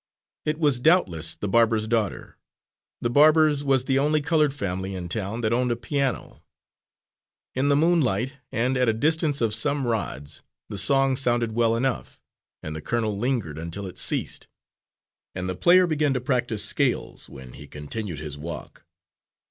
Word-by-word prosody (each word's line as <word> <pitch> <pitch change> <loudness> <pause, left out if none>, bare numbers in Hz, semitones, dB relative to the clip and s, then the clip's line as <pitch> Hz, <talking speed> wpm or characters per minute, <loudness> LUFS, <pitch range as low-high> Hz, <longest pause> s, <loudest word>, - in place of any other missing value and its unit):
"_ - - +3
It 150 - -7
was 145 -6 +2
doubtless 90 - +2
the 100 - -4
barber's 115 +1 +2
daughter. 110 -4 -2 0.7
The 120 - 0
barber's 150 +1 +5
was 135 -2 +2
the 135 0 +2
only 150 +2 +2
coloured 150 0 +2
family 95 -7 -4
in 90 -2 -6
town 105 +4 -3
that 110 0 +1
owned 125 +1 +1
a 120 - +1
piano. 135 +2 -3 1.1
In 135 +2 +1
the 140 - +4
moonlight, 140 - +2 0.2
and 125 +3 0
at 125 -2 +2
a - - +2
distance 155 +2 +1
of 115 -2 +1
some 140 +5 +1
rods, 80 - -3 0.3
the 105 - -5
song 135 +6 +3
sounded 120 -3 +1
well 115 0 +2
enough, 125 +2 -2 0.4
and 75 0 -5
the 80 - -6
colonel 110 +2 -1
lingered 105 - -2
until 85 +5 -6
it 90 - -7
ceased, - - -1 0.9
and 90 0 -3
the 95 - -1
player 180 - +5
began 150 -4 0
to - - +1
practise 120 -5 0
scales, - - -1
when 65 -2 -11
he 75 - -11
continued 80 +6 -5
his 75 -1 -7
walk. 80 +2 -8
120 Hz, 165 wpm, -24 LUFS, 95-140 Hz, 1.1 s, barber's